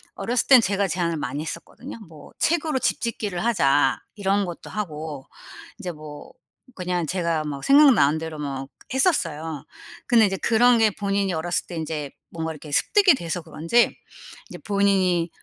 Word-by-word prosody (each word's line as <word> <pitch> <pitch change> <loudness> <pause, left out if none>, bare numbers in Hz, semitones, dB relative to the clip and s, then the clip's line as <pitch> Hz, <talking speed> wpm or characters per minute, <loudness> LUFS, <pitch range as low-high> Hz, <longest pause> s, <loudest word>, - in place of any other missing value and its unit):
어렸을 235 +5 -1
땐 260 -3 +8
제가 200 -1 0
제안을 170 -2 -1
많이 145 0 -4
했었거든요? 240 - -8
뭐 160 -2 -14
"책으로 310 -4 +1
집 - - 0
짓기를 210 -6 -3
하자." 140 - +2 0.2
이런 200 -1 0
것도 175 -2 -8
하고 155 -8 -6 0.5
이제 180 - -4
뭐 150 -2 -11 0.4
그냥 180 -2 -2
제가 170 -2 -1
뭐 140 -2 -5
생각나는 260 - +5
대로 160 -1 -6
뭐 135 -2 -4 0.3
했었어요. 165 - 0 0.4
근데 230 -3 +5
이제 195 -1 -1
그런 240 +4 +4
게 220 -1 +5
본인이 200 -1 -1
어렸을 170 +2 -2
때 175 - -7
인제 155 -3 -4 0.2
뭔가 160 -1 -4
이렇게 150 -1 -10
습득이 380 - +4
돼서 175 -5 -4
그런지 165 +8 +1 0.5
이제 - - -8
본인이 190 -4 +1
175 Hz, 330 characters per minute, -23 LUFS, 155-215 Hz, 0.5 s, 땐